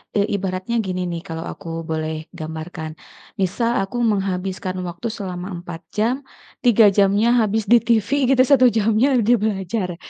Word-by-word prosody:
eee, 205 Hz, 0 st, +2 dB
ibaratnya 190 Hz, +3 st, -3 dB
gini 185 Hz, -2 st, -3 dB
nih 170 Hz, -1 st, -4 dB
kalau 165 Hz, 0 st, -6 dB
aku -, -, -9 dB, 0.2 s
boleh 155 Hz, 0 st, -3 dB
gambarkan, 160 Hz, 0 st, -6 dB, 0.5 s
misal 230 Hz, +6 st, 0 dB
aku 195 Hz, +5 st, -3 dB, 0.2 s
menghabiskan 190 Hz, -1 st, -2 dB
waktu 175 Hz, +4 st, -5 dB
selama 185 Hz, -4 st, -5 dB, 0.2 s
4 170 Hz, -2 st, -7 dB, 0.2 s
jam, 225 Hz, +4 st, +2 dB, 0.4 s
3 225 Hz, -4 st, +5 dB
jamnya 200 Hz, +3 st, +3 dB
habis 220 Hz, 0 st, +1 dB
di 240 Hz, -, +8 dB
TV 230 Hz, -2 st, +1 dB, 0.3 s
gitu 255 Hz, -, +5 dB
1 260 Hz, -2 st, +7 dB
jamnya 225 Hz, +4 st, +2 dB
di 235 Hz, -, +4 dB
belajar, 195 Hz, -3 st, -2 dB
195 Hz, 150 wpm, -21 LUFS, 180-225 Hz, 0.5 s, di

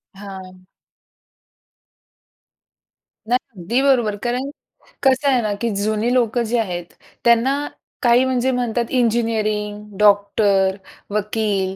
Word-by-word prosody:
हां. 190 Hz, -2 st, -11 dB, 2.6 s
नाही, 250 Hz, +2 st, +2 dB, 0.2 s
अगदी 240 Hz, +10 st, 0 dB
बरोबर. 240 Hz, -7 st, +2 dB
कारण 250 Hz, +3 st, -2 dB, 0.5 s
कसं 270 Hz, +1 st, +3 dB
आहे 255 Hz, -3 st, +3 dB
ना, 215 Hz, -2 st, -1 dB
की 235 Hz, -, 0 dB
जुनी 215 Hz, +2 st, 0 dB
लोकं 240 Hz, -1 st, +1 dB
जी 230 Hz, +2 st, -1 dB
आहेत. 180 Hz, -6 st, -2 dB, 0.4 s
त्यांना 265 Hz, +5 st, +3 dB, 0.3 s
काही 240 Hz, 0 st, +4 dB
म्हणजे 260 Hz, 0 st, +1 dB
म्हणतात 240 Hz, -1 st, -1 dB
इंजिनिअरिंग, 215 Hz, -4 st, -1 dB
डॉक्टर, 200 Hz, -1 st, +3 dB, 0.4 s
वकील 205 Hz, -2 st, -1 dB
225 Hz, 100 wpm, -20 LUFS, 205-245 Hz, 2.6 s, काही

